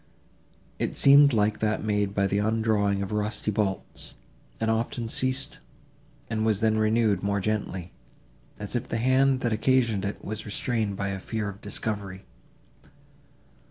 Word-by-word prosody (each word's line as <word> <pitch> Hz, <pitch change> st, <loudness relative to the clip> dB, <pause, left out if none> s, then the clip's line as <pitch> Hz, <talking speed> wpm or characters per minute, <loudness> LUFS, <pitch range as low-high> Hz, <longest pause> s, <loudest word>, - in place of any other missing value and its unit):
It -, -, -2 dB
seemed 140 Hz, +1 st, +7 dB
like 105 Hz, -2 st, +1 dB
that 110 Hz, -1 st, 0 dB
made 105 Hz, -2 st, 0 dB
by 100 Hz, -, +2 dB
the 100 Hz, +1 st, +1 dB
undrawing 105 Hz, -2 st, +1 dB
of 100 Hz, -, -6 dB
rusty 105 Hz, 0 st, -1 dB
bolts, 100 Hz, -2 st, -3 dB, 0.4 s
and 110 Hz, 0 st, +1 dB
often 115 Hz, +1 st, -2 dB
ceased, 130 Hz, -, -1 dB, 0.7 s
and 110 Hz, -1 st, -2 dB
was 110 Hz, -3 st, +2 dB
then 110 Hz, -1 st, +2 dB
renewed 110 Hz, -3 st, +2 dB
more 100 Hz, 0 st, 0 dB
gently, 95 Hz, -3 st, -3 dB, 0.7 s
as 105 Hz, +3 st, -6 dB
if 120 Hz, -, -2 dB
the 115 Hz, -, -2 dB
hand, 130 Hz, +2 st, +3 dB
that 120 Hz, -2 st, 0 dB
occasioned 115 Hz, -3 st, +2 dB
it, 100 Hz, +1 st, -5 dB
was 110 Hz, +1 st, -4 dB
restrained 110 Hz, -1 st, -2 dB
by 100 Hz, 0 st, -2 dB
a 95 Hz, -1 st, -3 dB
fear 110 Hz, +1 st, -3 dB
of 100 Hz, +2 st, -10 dB
discovery. 100 Hz, -3 st, -3 dB
110 Hz, 150 wpm, -26 LUFS, 100-115 Hz, 0.7 s, seemed